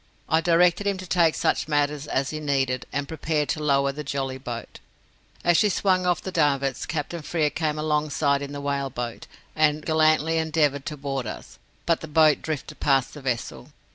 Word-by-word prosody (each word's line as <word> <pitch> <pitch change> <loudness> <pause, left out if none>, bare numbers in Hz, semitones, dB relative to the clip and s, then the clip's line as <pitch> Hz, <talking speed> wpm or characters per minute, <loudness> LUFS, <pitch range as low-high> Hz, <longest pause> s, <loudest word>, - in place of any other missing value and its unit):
I 160 0 +3
directed 175 +3 +3
him 200 -1 +1
to 185 - -7
take 170 -3 +3
such - - 0
matters 145 -1 0
as 135 -1 -1
he 155 - -4
needed, 135 -4 -1
and 140 0 -2
prepared 155 -1 -1
to 155 - -1
lower 140 -1 +2
the 150 +2 -6
jolly 135 -2 -3
boat. 120 -3 -7 0.6
As 175 -1 +4
she 210 - +4
swung 185 -2 +1
off 175 -2 +1
the 190 - -4
davits, 140 -6 +1
Captain 165 0 -3
Frere 150 -1 0
came 155 0 -1
alongside 150 -2 +1
in 140 0 -5
the 145 0 -6
whale 140 -1 -1
boat, 120 -2 -6 0.3
and 155 -1 +2
gallantly 155 0 +3
endeavoured 155 -3 0
to 150 -2 -4
board 135 -3 -3
us, - - -8 0.3
but 165 - +1
the 160 - -6
boat 155 -1 +4
drifted 150 -1 -5
past 135 -2 +2
the 150 - -9
vessel. 125 +2 -4
150 Hz, 190 wpm, -25 LUFS, 140-160 Hz, 0.6 s, As